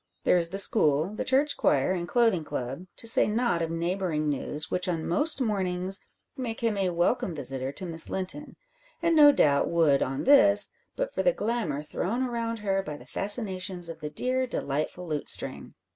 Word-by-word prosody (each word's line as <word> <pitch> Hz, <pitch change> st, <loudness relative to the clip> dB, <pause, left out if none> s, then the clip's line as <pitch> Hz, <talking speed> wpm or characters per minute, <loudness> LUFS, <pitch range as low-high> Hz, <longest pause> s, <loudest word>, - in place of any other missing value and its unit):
There -, -, +4 dB
is 170 Hz, -1 st, +3 dB
the 195 Hz, -, -5 dB
school, 165 Hz, -3 st, +3 dB
the 215 Hz, -, -3 dB
church 280 Hz, +3 st, +2 dB
choir, 140 Hz, +3 st, +2 dB
and 175 Hz, -2 st, -2 dB
clothing 225 Hz, -6 st, +2 dB
club, 135 Hz, +6 st, -5 dB
to -, -, -9 dB
say 230 Hz, -, +4 dB
nought 220 Hz, -5 st, 0 dB
of 165 Hz, -, -1 dB
neighbouring 165 Hz, -2 st, -2 dB
news, 150 Hz, +2 st, -2 dB
which 180 Hz, +1 st, -1 dB
on 165 Hz, -3 st, -2 dB
most 295 Hz, -, +2 dB
mornings 190 Hz, -5 st, -1 dB, 0.3 s
make 245 Hz, -3 st, -5 dB
him 230 Hz, -2 st, +1 dB
a 195 Hz, -2 st, 0 dB
welcome 175 Hz, +3 st, 0 dB
visitor 135 Hz, -2 st, -4 dB
to 185 Hz, -, -4 dB
Miss 165 Hz, -2 st, +2 dB
Linton; 190 Hz, +11 st, -3 dB, 0.5 s
and 335 Hz, -1 st, +3 dB
no 295 Hz, -2 st, +8 dB
doubt 140 Hz, -, +2 dB
would 160 Hz, -5 st, +3 dB
on 135 Hz, +1 st, -2 dB
this, 205 Hz, -7 st, +5 dB, 0.2 s
but -, -, -3 dB
for -, -, -1 dB
the -, -, +3 dB
glamour 215 Hz, -, -2 dB
thrown 220 Hz, +10 st, -2 dB
around 230 Hz, -2 st, -2 dB
her 195 Hz, -2 st, -1 dB
by 150 Hz, -5 st, -7 dB
the -, -, -14 dB
fascinations 190 Hz, -4 st, -3 dB
of 165 Hz, -, -8 dB
the 150 Hz, -, -5 dB
dear 255 Hz, +9 st, -1 dB
delightful 155 Hz, -, -3 dB
Lutestring. 150 Hz, -2 st, -2 dB
185 Hz, 185 wpm, -27 LUFS, 160-230 Hz, 0.5 s, no